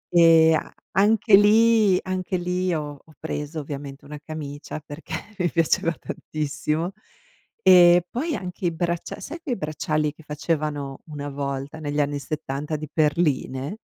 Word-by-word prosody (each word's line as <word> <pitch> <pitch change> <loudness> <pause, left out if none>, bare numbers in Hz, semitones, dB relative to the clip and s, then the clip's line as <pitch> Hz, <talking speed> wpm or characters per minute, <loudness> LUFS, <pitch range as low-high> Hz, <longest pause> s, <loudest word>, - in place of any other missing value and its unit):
Ehm, 165 -1 +7
a - - -3 0.2
anche 210 +1 +5
lì 215 -1 +5
anche 185 0 -2
lì 180 +1 -1
ho 145 -3 -4
ho 160 - -20
preso 155 0 -4
ovviamente 140 -1 -7
una 150 +1 -8
camicia, 150 -1 -6
perché 145 +2 -10 0.3
mi 175 - +2
piaceva 165 0 +2
tantissimo. 155 +1 -3 0.7
Ehm, 175 -1 +8
poi 305 +6 -2
anche 180 0 -6
i - - +1
braccia 170 0 -3
sai 325 +4 -7
quei 270 -7 -2
bracciali 155 -1 -1
che 160 - -17
facevano 150 -2 -3
una 145 -1 -6
volta 140 +2 -4
negli 145 -1 -2
anni 145 0 -1
'70 150 0 -4
di 155 0 -5
perline? 150 0 0
155 Hz, 140 wpm, -24 LUFS, 145-180 Hz, 0.7 s, Ehm